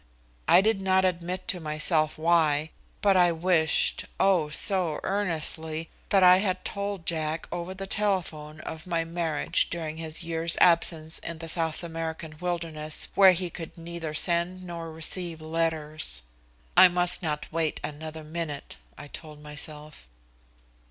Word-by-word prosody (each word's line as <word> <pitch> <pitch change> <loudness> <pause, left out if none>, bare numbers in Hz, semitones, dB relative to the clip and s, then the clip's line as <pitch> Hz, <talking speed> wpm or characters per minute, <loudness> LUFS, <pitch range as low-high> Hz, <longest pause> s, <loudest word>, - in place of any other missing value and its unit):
I - - +7
did 215 -1 +2
not 190 0 +3
admit 180 0 -2
to 180 - 0
myself 155 0 +1
why, 155 -2 +2 0.3
but 200 -2 +4
I 175 -1 +5
wished, 165 -1 +2
oh! 180 -6 +3
so 175 -1 0
earnestly, 160 -4 -1 0.2
that 195 -2 +4
I 180 0 +8
had 185 -2 -1
told 200 -3 -4
Jack 160 -1 -1
over 175 +2 -4
the 195 +1 -5
telephone 170 -7 -1
of 160 +2 -8
my 165 -2 0
marriage 165 -2 0
during 160 -2 -4
his 160 0 -3
year's 165 0 -1
absence 165 -2 +3
in 170 - -6
the 165 0 -7
South 165 0 +1
American 160 -1 -5
wilderness, 165 -3 -2
where 190 -2 +7
he 180 0 -3
could 165 0 -8
neither 165 -2 -5
send 175 +3 +2
nor 170 -2 -6
receive 165 +1 -2
letters. 155 - -2 0.5
I 185 - +10
must 180 +1 +1
not 150 -3 -3
wait 160 -1 -1
another 155 +1 -6
minute, 155 -2 -5 0.2
I - - -9
told 150 0 -10
myself. 150 - -5
165 Hz, 145 wpm, -27 LUFS, 155-180 Hz, 0.5 s, I